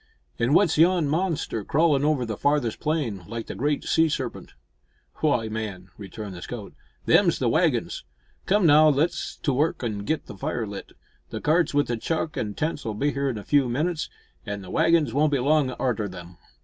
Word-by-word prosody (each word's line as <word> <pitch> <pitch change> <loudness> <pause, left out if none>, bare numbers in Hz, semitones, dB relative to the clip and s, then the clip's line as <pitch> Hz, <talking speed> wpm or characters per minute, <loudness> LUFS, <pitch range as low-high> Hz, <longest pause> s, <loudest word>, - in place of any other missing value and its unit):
"An' 115 - +2
w'at's 160 +3 +3
yon 170 -2 +4
monster 160 - -1
crawlin' 145 +2 +2
over 145 -4 +1
the 110 -2 -4
farthest 145 -3 0
plain, 145 - -2
like 115 -1 -5
the - - -6
great 145 +1 -1
sea 160 0 +3
serpent?" 130 -4 -4 0.6
"Why, 135 -8 +1
man," 105 -4 -5
returned 100 0 -8
the 85 - -9
scout, 110 -1 -7 0.3
"them's - - +4
the - - 0
waggins. - - +1 0.4
Come, 200 -1 +3
now, 155 0 +7
let's 150 +4 0
to 140 - +1
work 150 +1 0
an' 110 -4 -2
git 155 +10 -2
the - - -10
fire 115 +4 -3
lit. 100 -1 -8 0.4
The - - -5
cart 160 0 +1
wi' 145 - +4
the 120 -4 -3
chuck 160 +5 -2
an' 105 -2 -3
tents'll 150 -8 -2
be 145 +7 0
here 140 +1 -1
in 120 - -3
a 105 - -7
few 140 -1 +2
minutes, 155 +6 -1 0.3
an' 100 -2 -5
the 90 - -9
waggins 165 -3 +3
won't 150 +2 +2
be - - +3
long 140 +1 +2
arter 110 -6 -1
'em." 90 -1 -11
140 Hz, 190 wpm, -25 LUFS, 110-155 Hz, 0.6 s, now